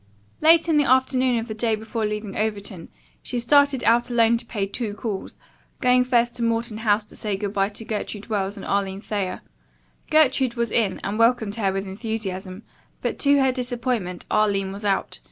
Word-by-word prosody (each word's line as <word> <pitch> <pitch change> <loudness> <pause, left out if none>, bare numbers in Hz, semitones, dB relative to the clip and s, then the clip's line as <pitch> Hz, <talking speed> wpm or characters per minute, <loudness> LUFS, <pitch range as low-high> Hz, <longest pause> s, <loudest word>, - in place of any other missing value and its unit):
Late 325 +1 +5
in 320 -2 +3
the 290 -1 +3
afternoon 260 -1 +3
of 230 +1 -3
the 220 - -4
day 225 0 0
before 220 0 -3
leaving 210 -1 -5
Overton, 200 -5 -3 0.3
she 250 - -4
started 280 +2 +3
out 235 +2 +3
alone 235 -1 +4
to 235 - -7
pay 205 -3 -2
two 205 +1 -4
calls, 205 -2 -5 0.4
going 250 -1 +4
first 240 -1 +2
to 235 - -2
Morton 230 -1 -1
House 215 -1 +2
to - - -17
say 210 -3 -2
good 200 0 -4
bye 195 -1 +1
to 220 +2 -8
Gertrude 210 -2 -4
Wells 205 -2 -2
and 195 - -8
Arline 195 -1 -1
Thayer. 200 -4 -3 0.7
Gertrude 265 -5 +3
was 235 -2 -1
in 210 -5 +1
and 205 +3 -3
welcomed 230 -3 +3
her 205 -3 0
with 195 +1 -3
enthusiasm, 195 -2 -5 0.4
but, - - -2
to 285 0 +4
her 265 -1 +3
disappointment, 245 -7 -3
Arline 200 -2 +1
was 200 +2 -7
out. 195 -1 -1
220 Hz, 190 wpm, -23 LUFS, 200-245 Hz, 0.7 s, Late